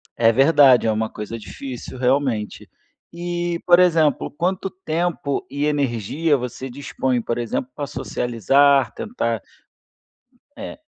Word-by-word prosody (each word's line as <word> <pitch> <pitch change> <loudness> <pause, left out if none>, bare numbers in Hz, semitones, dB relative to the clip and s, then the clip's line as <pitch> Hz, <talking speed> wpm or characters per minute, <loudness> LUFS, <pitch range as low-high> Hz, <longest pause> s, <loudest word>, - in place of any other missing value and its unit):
É 115 -1 +4
verdade, 135 -2 +5
é - - +3
uma 110 +1 -1
coisa 105 +2 -6
difícil, 125 +3 -8
realmente. 125 -4 -1 0.4
E, 175 0 -3
por 175 0 +6
exemplo, 160 -5 +3
quanto 185 +4 -2
tempo 170 -4 -2
e 145 +1 -2
energia 145 +2 0
você 125 +1 -6
dispõe, 130 -2 -2
por 115 +1 -3
exemplo, 120 +2 -3
para 145 -1 -4
socializar, 130 +3 +2
tentar 115 - -3 1.2
Eh, 280 +1 -8
140 Hz, 120 wpm, -21 LUFS, 120-165 Hz, 1.2 s, por